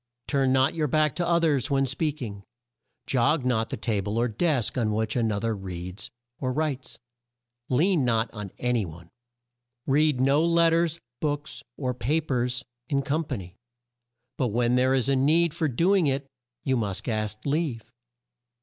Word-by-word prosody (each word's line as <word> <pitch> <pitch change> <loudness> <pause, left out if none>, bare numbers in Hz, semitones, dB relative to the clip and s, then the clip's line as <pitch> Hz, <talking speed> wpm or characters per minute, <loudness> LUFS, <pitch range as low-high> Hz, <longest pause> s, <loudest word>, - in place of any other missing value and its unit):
"Turn 135 -3 +2
not 130 +1 +3
your 155 -2 0
back 155 0 +2
to 175 -1 0
o 170 0 +4
thers 145 -6 +1
when 135 -1 +2
speak 145 +2 -2
ing; 100 -3 -7 0.6
jog 130 +2 +2
not 115 -3 +1
the - - -4
ta 105 -4 -1
ble 105 +3 -3
or 120 +1 +2
desk 125 +1 0
on 110 -4 +1
which 110 0 -1
an 115 -3 +1
o 100 - -1
ther 115 +1 -1
reads 90 +1 -7 0.3
or 130 -2 -1
writes; 140 -2 -2 0.7
lean 160 +4 +3
not 115 -2 +2
on 105 -3 -6
a 125 0 0
ny 115 -3 +1
one. 85 0 -10 0.7
"Read 150 -1 +3
no 140 +4 +4
let 170 0 +4
ters, 165 0 +1 0.2
books, 145 -1 -2 0.2
or 130 -3 -1
pa 135 +6 0
pers 125 -3 -1 0.2
in 140 -2 +1
com 155 +4 0
pa 140 - -3
ny; 90 -3 -9 0.8
but 130 - +1
when 120 +2 +1
there 130 +1 +3
is 130 -1 +1
a 140 - +3
need 155 +5 +3
for 165 -2 0
do 170 +9 +2
ing 180 -6 +3
it, 135 +1 0 0.4
you 130 - +1
must 105 -5 -2
ask 110 -2 -2
leave. 140 -7 -1
130 Hz, 185 wpm, -26 LUFS, 115-150 Hz, 0.8 s, o